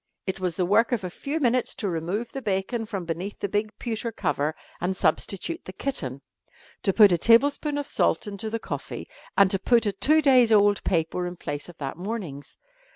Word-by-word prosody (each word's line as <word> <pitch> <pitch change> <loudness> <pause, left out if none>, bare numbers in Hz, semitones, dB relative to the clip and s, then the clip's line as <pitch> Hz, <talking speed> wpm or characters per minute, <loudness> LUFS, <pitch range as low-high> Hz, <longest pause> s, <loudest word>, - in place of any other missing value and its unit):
It 190 0 -3
was 180 -3 -2
the 180 - 0
work 215 +7 +3
of 235 -5 0
a 180 - -4
few 285 - -3
minutes 250 -3 +1
to 205 - -2
remove 180 +7 -3
the 270 - -5
bacon 215 +2 -2
from 195 -5 -4
beneath 175 +5 -4
the - - -2
big 210 +2 -1
pewter 230 0 -3
cover 150 -5 -1 0.2
and 185 +2 -1
substitute 180 -3 0
the 185 - -8
kitten, 140 - -2 0.6
to 195 - +2
put 205 0 +7
a 175 - +2
tablespoonful 285 - +3
of - - -8
salt - - +1
into 205 +1 -5
the 230 - -2
coffee, - - -6 0.3
and 195 -1 +6
to 195 - +2
put 235 +3 +3
a 205 - +2
two 310 +10 +3
days' 255 -5 +5
old 205 -1 +4
paper 175 0 0
in 175 - -6
place 145 -1 -5
of 175 - -13
that 135 0 -5
morning's. 180 -8 -6
200 Hz, 205 wpm, -25 LUFS, 175-230 Hz, 0.6 s, put